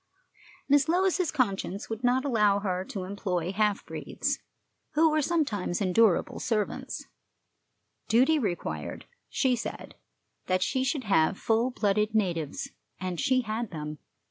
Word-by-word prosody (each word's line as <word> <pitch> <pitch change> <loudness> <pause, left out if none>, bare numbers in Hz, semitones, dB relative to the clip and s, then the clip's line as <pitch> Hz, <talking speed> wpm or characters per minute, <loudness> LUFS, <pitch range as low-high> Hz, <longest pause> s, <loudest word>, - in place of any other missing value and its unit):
Miss 290 +2 +4
Lois's 365 0 +2
conscience 200 -7 -1
would 225 +2 -5
not 250 +2 +2
allow 210 -6 +3
her 185 -2 -1
to 190 -1 -5
employ 185 -2 -2
half 210 0 +1
breeds, - - -2 0.5
who 315 +1 +4
were 310 0 +2
sometimes 270 - 0
endurable 195 -1 +3
servants; 215 -4 -2 1.0
duty 265 +7 +4
required, 195 -9 -3 0.2
she 260 -2 +2
said, 235 - -6 0.5
that 185 0 +2
she 260 - 0
should 270 0 -1
have 195 -3 +3
full 230 +3 +2
blooded 210 -2 0
natives. 170 -8 -1 0.3
And 185 -2 -3
she 260 -2 +3
had 225 0 -3
them. 150 -2 -6
215 Hz, 130 wpm, -28 LUFS, 190-260 Hz, 1.0 s, Miss